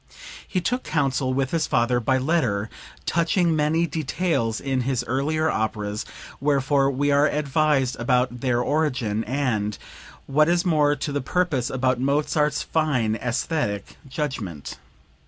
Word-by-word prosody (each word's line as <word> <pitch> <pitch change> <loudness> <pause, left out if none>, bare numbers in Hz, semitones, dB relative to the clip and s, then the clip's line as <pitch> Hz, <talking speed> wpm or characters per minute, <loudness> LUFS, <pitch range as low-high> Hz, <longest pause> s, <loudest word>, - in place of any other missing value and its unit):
He 185 - -1
took 250 +8 -1
counsel 135 -3 0
with 130 0 0
his 165 -2 0
father 120 +1 +2
by 130 +3 +1
letter 125 -8 0 0.3
touching 170 0 +2
many 155 +2 +2
details 155 -7 -1
in 135 -2 -1
his 125 -1 -1
earlier 150 +6 0
operas, 105 -4 -2 0.3
wherefore 140 0 +2
we 140 +2 0
are 145 +1 +4
advised 145 -3 +1
about 125 0 +1
their 120 -2 +1
origin, 125 -7 0
and, 115 -6 -1 0.5
what 150 +3 +3
is 175 +2 +2
more 150 -4 +3
to 145 +1 -4
the 140 0 -1
purpose, 145 -4 0
about 130 -1 0
Mozart's 150 +1 +1
fine 140 -9 +1
aesthetic 120 - -2
judgment. 125 - -4
135 Hz, 135 wpm, -24 LUFS, 125-155 Hz, 0.5 s, are